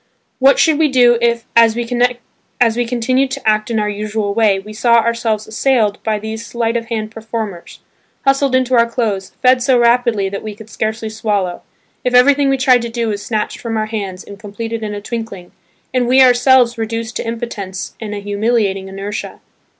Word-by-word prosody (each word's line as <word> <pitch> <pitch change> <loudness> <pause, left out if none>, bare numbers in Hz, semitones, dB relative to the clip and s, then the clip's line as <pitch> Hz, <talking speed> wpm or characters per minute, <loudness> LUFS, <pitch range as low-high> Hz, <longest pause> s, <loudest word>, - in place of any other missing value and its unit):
What 275 +1 +5
should 315 -2 +3
we 315 - +4
do 245 -3 +4
if, 235 0 +1
as 230 -1 +5
we 240 0 -2 1.0
continued 255 +3 0
to 270 -3 -6
act 215 0 +2
in 225 -2 0
our 210 - 0
usual 210 0 -3
way, 215 -3 +3
we 210 +2 -9
saw 235 +2 +3
ourselves 230 -2 +1
assailed 220 -2 0
by 215 -1 -1
these 220 +1 -6
sleight 230 0 -2
of 230 -1 -2
hand 215 -2 -3
performers, 220 -5 -6 0.4
hustled 275 -1 +2
into 260 0 +1
our 235 -1 +4
clothes, 210 -6 -2
fed 255 0 +5
so 250 0 +3
rapidly 235 -4 +2
that 200 +1 -5
we 215 -1 -7
could 220 0 -13
scarcely 220 +1 -3
swallow, 205 -5 -2 0.4
if 250 0 0
everything 280 +2 +5
we 270 - +2
tried 255 -1 +4
to 235 - -4
do 230 -1 -2
was 205 -1 -4
snatched 215 -2 -3
from 225 -2 -3
our 215 - 0
hands 200 -4 -5
and 200 0 -12
completed 225 +2 -6
in 210 -1 -4
a 205 - -6
twinkling 215 -5 -6 0.4
and 250 -2 +1
we 255 +2 +4
ourselves 245 -1 +4
reduced 230 +1 -4
to - - -5
impotence 210 -5 -5
and 210 -2 -5
to - - -4
a - - -6
humiliating 205 -1 -1
inertia? 195 +2 -6
225 Hz, 190 wpm, -16 LUFS, 210-245 Hz, 1.0 s, What